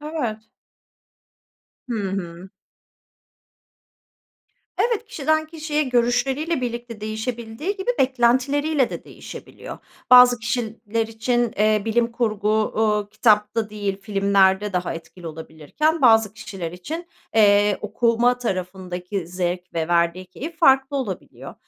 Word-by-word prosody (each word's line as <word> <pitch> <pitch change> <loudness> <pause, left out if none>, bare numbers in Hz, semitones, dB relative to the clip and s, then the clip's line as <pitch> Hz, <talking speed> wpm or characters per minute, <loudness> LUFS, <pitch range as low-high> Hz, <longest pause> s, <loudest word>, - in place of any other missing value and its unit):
Evet. 245 -9 -4 1.4
Hı 210 -5 -2
hı. 180 -1 -6 2.3
Evet, 465 -1 +1
kişiden 315 - 0
kişiye 310 -1 -2
görüşleriyle 260 +4 0
birlikte 240 -2 -5
değişebildiği 225 - -4
gibi 390 +6 -1
beklentileriyle 265 +3 +2
de - - -7
değişebiliyor. - - -10 0.3
Bazı 250 -1 +8
kişiler 230 -1 -2
için, 235 +1 -1
eee, 215 0 +3
bilim 230 +1 +1
kurgu, 215 -3 -1
uuu, 215 -1 +1
kitapta 210 -1 +2
değil, 200 -2 -3
filmlerde 200 -1 +2
daha 180 -1 -2
etkili 165 +1 -11
olabilirken; 160 - -2
bazı 225 -4 +5
kişiler 195 -6 -7
için, 320 - -6 0.3
eee, 205 -1 +4
okuma 235 +3 +1
tarafındaki 185 -3 -4
zevk 180 0 -3
ve 160 -1 -1
verdiği 170 +2 +1
keyif 310 - -8
farklı 270 +1 +4
olabiliyor. 210 -9 -6
220 Hz, 105 wpm, -22 LUFS, 195-250 Hz, 2.3 s, Bazı